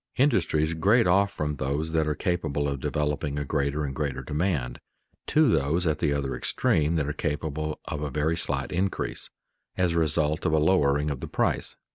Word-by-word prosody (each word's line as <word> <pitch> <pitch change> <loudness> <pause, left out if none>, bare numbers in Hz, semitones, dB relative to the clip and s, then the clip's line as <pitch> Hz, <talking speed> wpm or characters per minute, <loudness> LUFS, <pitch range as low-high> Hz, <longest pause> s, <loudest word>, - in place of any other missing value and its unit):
Industries 80 - +2
grade 100 +9 +3
off 100 +3 +3
from 75 -5 -3
those 70 +5 -1
that 80 -1 +1
are 75 - 0
capable 75 -6 -1
of 70 -1 -2
developing 75 0 -1
a 75 - -2
greater 70 +1 -1
and 70 - -4
greater 70 -2 -3
demand, 75 -6 -1 0.5
to 155 0 +4
those 80 - +2
at 80 -2 0
the 75 -4 +1
other 70 -2 -1
extreme 80 +2 +1
that 75 -3 0
are 75 - -2
capable 75 0 -3
of 75 -2 -4
a 75 - -2
very 75 +4 0
slight 70 -5 -2
increase, 95 +2 -2 0.5
as 90 -2 +2
a 85 - +1
result 75 0 +1
of 80 - +1
a - - +4
lowering 75 -3 +2
of 70 - -4
the - - -6
price. - - 0
75 Hz, 190 wpm, -26 LUFS, 70-85 Hz, 0.5 s, to